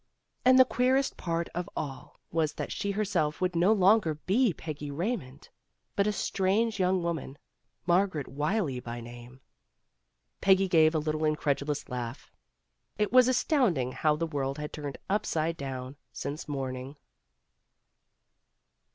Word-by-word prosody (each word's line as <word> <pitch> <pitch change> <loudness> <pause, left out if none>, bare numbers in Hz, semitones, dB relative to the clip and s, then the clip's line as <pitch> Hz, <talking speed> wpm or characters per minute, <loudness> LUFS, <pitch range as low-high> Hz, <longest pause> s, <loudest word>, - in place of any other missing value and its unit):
And 255 0 +6
the 260 - +8
queerest 260 +2 +1
part 170 -1 -2
of 175 +1 -4
all 145 +1 -6
was 160 -2 0
that - - -5
she 200 - -2
herself 195 -7 0
would 180 -1 0
no 175 +5 +4
longer 195 -5 +4
be 205 - +2
Peggy 150 -3 -6
Raymond, 145 - -4 0.5
but 200 0 +2
a - - +3
strange 200 +2 0
young 185 -1 +2
woman, 160 -5 -3 0.5
Margaret 175 -4 +1
Wylie 150 - -1
by 120 -1 -6
name. 120 +2 -11 1.0
Peggy 195 0 +4
gave 160 -3 +4
a - - +4
little 155 0 -1
incredulous 150 -1 0
laugh. 125 -1 -6 0.7
It 210 -1 0
was 255 -1 +7
astonishing 235 - +2
how 150 +3 +1
the 165 +2 -1
world 140 -3 -2
had 150 0 -6
turned 145 -3 -5
upside 165 -5 0
down 135 -2 -6
since 140 +6 -5
morning. 135 -1 -4
160 Hz, 135 wpm, -29 LUFS, 140-195 Hz, 1.0 s, the